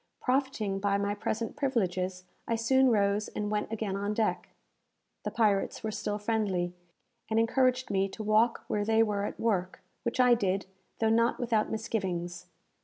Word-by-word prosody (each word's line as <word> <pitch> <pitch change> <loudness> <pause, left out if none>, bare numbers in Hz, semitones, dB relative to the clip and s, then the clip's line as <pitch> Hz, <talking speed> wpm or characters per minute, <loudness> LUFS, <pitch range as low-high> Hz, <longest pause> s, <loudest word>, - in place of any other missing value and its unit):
Profiting 255 -7 0
by 200 0 +1
my 200 0 0
present 220 +3 -3
privileges, 185 -10 -1 0.2
I 230 - +1
soon 260 +3 +4
rose 205 -1 +2
and 210 0 -4
went 210 +1 -1
again 215 -3 -2
on 205 +1 -2
deck. 220 -1 0 0.7
The - - -3
pirates 210 -3 +1
were 220 - -2
still 210 0 -2
friendly, 205 -5 -1 0.6
and 220 0 +2
encouraged 255 +2 +2
me 195 0 +1
to 215 - -7
walk 215 +2 +3
where 205 - 0
they 225 +1 +4
were 205 -2 -1
at - - -6
work; 190 -5 -1 0.2
which 235 +1 -3
I 250 -1 +6
did, 195 -4 0 0.3
though 220 -1 +2
not 230 +2 +2
without 230 -4 +1
misgivings. 180 -6 -3
215 Hz, 165 wpm, -30 LUFS, 200-230 Hz, 0.7 s, I